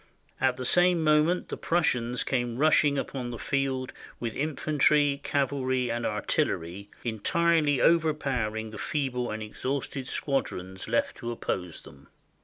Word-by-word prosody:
"At 130 -1 +2
the 130 - -5
same 175 +2 +3
moment 155 +3 +3
the - - -4
Prussians 125 -8 0
came 120 -3 -1
rushing 145 -1 +4
upon 130 -2 -3
the 120 - -5
field, 135 0 -1 0.3
with 115 -2 -4
infantry, 145 -1 +2
cavalry, 130 -3 0
and 120 0 -1
artillery, 100 -2 -1
entirely 145 +6 +2
over 165 -2 +4
powering 110 -7 -2
the 105 - -8
feeble 130 -5 -2
and 110 0 -4
exhausted 130 +4 -4
squadrons 95 -9 -3
left 115 +1 0
to 120 - -5
oppose 90 -7 -4
them. 70 0 -15
130 Hz, 135 wpm, -28 LUFS, 115-150 Hz, 0.3 s, rushing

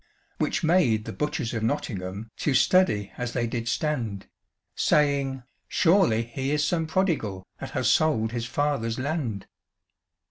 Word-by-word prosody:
Which - - 0
made 150 -11 +3
the - - -5
butchers 150 -6 -2
of 115 - -2
Nottingham 105 -1 -3
To 145 - 0
study 125 - +3
as 125 -1 -3
they 120 -2 0
did 115 0 -3
stand, 120 -10 -2 0.5
Saying, 140 -3 +1 0.2
"Surely 165 - +3
he 130 +4 -4
is 150 0 +1
some 165 -1 0
prodigal 155 - -1
That - - -6
has - - +1
sold 115 -9 +3
his 120 -1 -3
father's 135 -5 -1
land." 130 - -2
125 Hz, 140 wpm, -26 LUFS, 110-150 Hz, 0.5 s, made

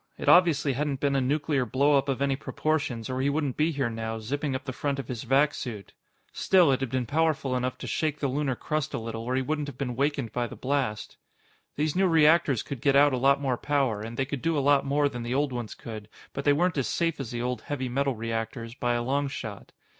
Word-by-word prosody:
It - - -6
obviously 155 -6 +5
hadn't 140 0 -2
been 140 0 +1
a 135 - +2
nuclear 145 +1 +1
blow 140 +5 +2
up 140 0 +1
of 135 0 0
any 140 -1 +1
proportions, 140 -5 -2
or 130 0 -2
he 140 - +2
wouldn't 145 -3 -1
be 155 +2 +2
here 140 -4 -1
now, 115 -1 -4
zipping 135 +5 -2
up 130 - -5
the 130 - -4
front 140 +2 -2
of 135 -4 -5
his 120 -3 -4
vac 140 +4 +3
suit. 105 -6 -7 0.4
Still, 180 -6 +4
it 130 - +1
had 135 -2 -2
been 130 0 -1
powerful 155 -1 +1
enough 125 0 -2
to - - -7
shake 155 -2 -1
the 140 - 0
lunar 135 0 -1
crust 155 +3 -2
a - - -1
little 115 0 -5
or 125 +3 -2
he 130 - +1
wouldn't 150 +1 -2
have 140 -3 -8
been 125 -3 -3
wakened 140 -3 -1
by 120 +1 -1
the - - -9
blast. 130 -6 -2 0.6
These 150 +1 0
new 190 +1 +3
reactors 160 -5 +4
could 135 -5 -6
get 140 -1 +3
out 145 0 +6
a - - +1
lot 140 +2 +4
more 135 -3 0
power, 135 -8 0
and 115 +2 -7
they 135 - +1
could 140 -1 -5
do 165 -1 +1
a - - +3
lot 140 -1 +4
more 145 +1 +2
than 125 -4 -5
the 120 +2 -2
old 140 -1 +1
ones 120 -3 -5
could, 110 -2 -8 0.2
but 140 - -4
they 145 - +5
weren't 170 0 +1
as 130 - 0
safe 165 +1 -1
as 135 -5 -4
the 120 0 -3
old 125 0 -2
heavy 135 -3 -3
metal 135 +1 0
reactors, 115 +1 -4
by 120 -1 -1
a 120 - -1
long 140 +3 0
shot. 135 - -7
135 Hz, 250 wpm, -27 LUFS, 120-145 Hz, 0.6 s, out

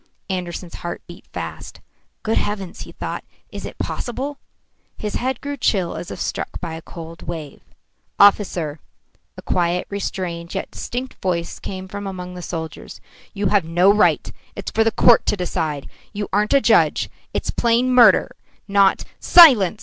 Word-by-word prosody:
Andersen's 180 -1 -4
heart 175 0 -5
beat 175 +1 -13
fast. - - -7 0.4
"Good 220 - +1
heavens!" 200 -3 -4
he - - -9
thought. - - -5 0.3
"Is - - -6
it - - -11
possible?" 270 +4 -4 0.6
His 210 -1 -4
head 260 0 -1
grew 285 0 -4
chill 190 -8 +1
as 175 - -6
if - - -7
struck - - -3
by 170 -3 -5
a 160 - -7
cold 165 0 -10
wave. 160 -4 -7 0.6
"Officer," 180 -7 +4 0.6
a - - -9
quiet, 175 0 0
restrained, 175 -4 -4
yet - - -4
distinct 255 +2 -6
voice 170 -2 -2
came 190 -1 -6
from 200 +1 -6
among 180 -1 -6
the 180 - -7
soldiers, 160 -2 -6 0.4
"you 200 -1 0
have 205 -2 +3
no 175 +5 +4
right 210 - +2 0.2
It's - - -5
for 225 - +3
the 225 - +3
court 235 +1 +5
to 210 - +2
decide 160 -5 -2 0.3
you 205 0 -3
aren't 210 +6 +2
a 275 - +5
judge - - +3 0.2
it's - - -2
plain 240 +2 +2
murder, 235 -6 +6 0.3
not 200 -1 +4
" - - -44 0.2
"Silence!" 235 - +9
190 Hz, 165 wpm, -21 LUFS, 175-215 Hz, 0.6 s, Silence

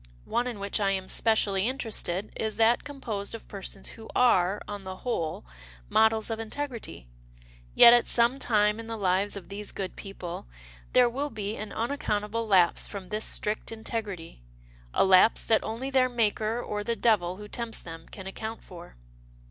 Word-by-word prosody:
One 245 +1 0
in 240 -3 -4
which 200 +1 -2
I 200 -1 +2
am 190 -1 -1
specially 205 -3 +2
interested 215 -7 -2
is 220 -1 -3
that 230 +1 +4
composed 230 -8 -4
of 230 - -11
persons 195 -1 -5
who 220 -1 -11
are, 200 -5 +4
on 205 -1 -6
the 190 0 -6
whole, 170 - -3 0.4
models 220 0 +3
of 225 - -2
integ 280 +6 -3
rity. 225 - -8 0.7
Yet, 235 - +10
at 240 -1 +4
some 240 +3 +3
time 210 -2 +2
in 225 - -7
the 225 0 -4
lives 195 +1 +1
of 195 -3 -9
these 205 +1 -5
good 190 -2 -5
people, 180 - -7 0.5
there 250 -1 +6
will 275 +5 -2
be 215 -3 -4
an 215 -1 -6
unaccountable 225 -3 -2
lapse 185 -4 +4
from 195 -3 -8
this 215 +1 -1
strict 210 +2 -2
integrity 210 - -5 0.3
— - - -25
a - - +5
lapse 190 +3 +5
that 220 - +2
only 240 +5 -4
their 255 -1 +4
Maker 225 -1 0
or 210 -3 -3
the 235 +2 -1
devil 195 -7 +2
who 210 +2 -9
tempts 235 +1 -4
them 165 -1 -10
can 190 - -9
account 220 +3 -6
for." 175 - -12
215 Hz, 180 wpm, -28 LUFS, 195-230 Hz, 0.7 s, Yet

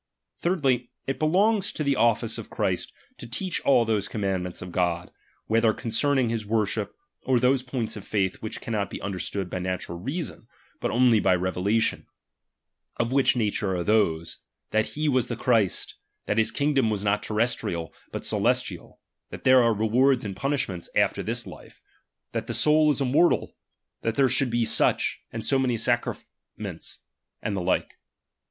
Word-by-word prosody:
Thirdly, 135 -9 +1 0.2
it 135 - -3
belongs 200 +6 +2
to 155 - -2
the 140 -1 +2
office 115 -1 +2
of - - -9
Christ - - -1 0.3
to - - -8
teach 175 +10 -2
all 120 -4 +4
those 110 -3 0
commandments 95 -4 -3
of 90 - -8
God, 85 -1 -1 0.3
whether 115 0 +3
concerning 125 +3 0
his 115 -1 -2
worship, 105 -1 -1 0.3
or 130 -2 +2
those 125 +2 +3
points 125 -3 -4
of 105 - -8
faith 95 -4 -1
which 110 +1 -5
cannot 105 -4 -2
be - - -6
understood 100 0 -3
by 90 +1 -4
natural 90 -1 -3
reason, 145 - -4 0.3
but - - -1
only 120 -2 +4
by 90 - +3
revela^ 95 +4 0
tion; - - -1 0.9
of 120 +1 0
which 135 -1 +3
nature 105 -4 0
are 90 - -1
those, 85 -6 +1 0.3
that 110 0 +2
he 155 +1 -2
wa3 130 -4 +2
the - - -3
Christ; 115 -7 +1 0.3
that 105 - +1
his 110 0 +3
kingdom 135 -1 +1
was 105 -2 -2
not 105 0 +1
terrestrial, 105 -7 -1 0.2
but - - -5
celestial; - - -1 0.3
that - - -9
there 130 0 +7
are 115 -1 +4
rewards 120 +4 +2
and 100 -2 -4
punishments 100 -7 -2
after - - +2
this - - -2
life; - - -12 0.5
that - - -3
the - - -2
soul 155 0 +4
is 145 - +1
immortal; 140 +7 +2 0.5
that 115 0 -1
there 135 -2 +4
should 135 0 +1
be 120 0 +1
such, - - +2
and 115 -1 -5
so 135 +2 +2
many 125 -3 +1
sacraments; 115 - -4 0.4
and 100 - -3
the 95 - -2
like. 90 +1 -1
115 Hz, 170 wpm, -26 LUFS, 100-130 Hz, 0.9 s, there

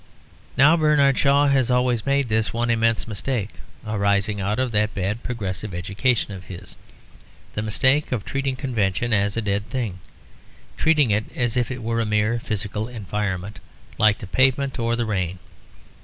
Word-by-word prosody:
Now 150 +5 +6
Bernard 150 -4 +3
Shaw 140 +1 +4
has 135 -3 +2
always 125 -2 +1
made 140 -1 +2
this 110 0 0
one 120 +1 0
immense 115 0 +1
mistake 110 0 -2 0.3
(arising 100 -1 0
out 105 +3 -1
of 130 -1 0
that 105 0 0
bad 100 +4 -2
progressive 105 -4 -4
education 100 +6 0
of 95 -2 -9
his), 90 -2 -10 0.8
the 110 - -2
mistake 130 +7 +2
of 120 -6 -2
treating 135 -1 -2
convention 120 -3 -1
as 100 +1 +1
a 115 - -1
dead 100 +1 -2
thing; 115 -8 -3 0.8
treating 150 -7 +3
it 105 +2 +1
as 120 -3 0
if 125 -2 +1
it 125 -2 -5
were 115 0 0
a - - 0
mere 105 +2 +1
physical 105 -1 -3
environment 105 -3 -4 0.4
like 105 -1 +4
the - - -8
pavement 130 +5 +1
or 115 0 +1
the 120 0 -1
rain. 95 -4 -2
115 Hz, 165 wpm, -23 LUFS, 105-125 Hz, 0.8 s, Now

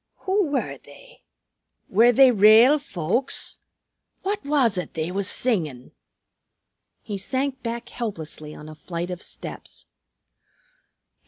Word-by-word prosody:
"Who 385 -1 +1
were 285 -2 -2
they? - - -17 0.7
Were 230 +5 +5
they 260 +1 +6
rale 225 +7 +7
folks? 235 - -2 0.6
What 405 +1 -2
was 280 -7 +2
it 180 - -7
they 160 +2 -2
was 195 0 -2
singin'?" 155 - -1 1.1
He 205 -2 -5
sank 265 +6 -2
back 235 0 -5
helplessly 160 -9 -6
on 150 - -11
a 155 - -9
flight 170 +3 -5
of 180 +1 -6
steps. - - -8
225 Hz, 115 wpm, -24 LUFS, 175-270 Hz, 1.1 s, rale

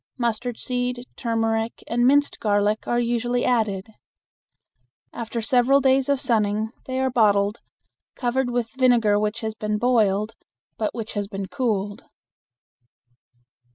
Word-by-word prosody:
Mustard 235 0 -2
seed, 245 0 -3
turmeric, 225 -1 -1
and 240 +1 +2
minced 285 +2 +3
garlic 205 0 +1
are 240 - +1
usually 240 +1 0
added. 210 -6 +1 1.3
After 230 0 -4
several 250 +4 +4
days 265 0 +2
of 280 -1 +2
sunning 220 -4 0 0.2
they 260 0 -2
are 265 0 +1
bottled, 205 -2 +2 0.6
covered 250 0 0
with 240 -2 -2
vinegar 235 -5 +3
which 210 +2 -2
has 220 -1 -3
been 210 -1 -2
boiled, 215 -3 +2 0.4
but 215 - -2
which 225 -1 -5
has 205 -1 -2
been 195 -1 -5
cooled. 205 -3 -2
230 Hz, 125 wpm, -23 LUFS, 210-245 Hz, 1.3 s, several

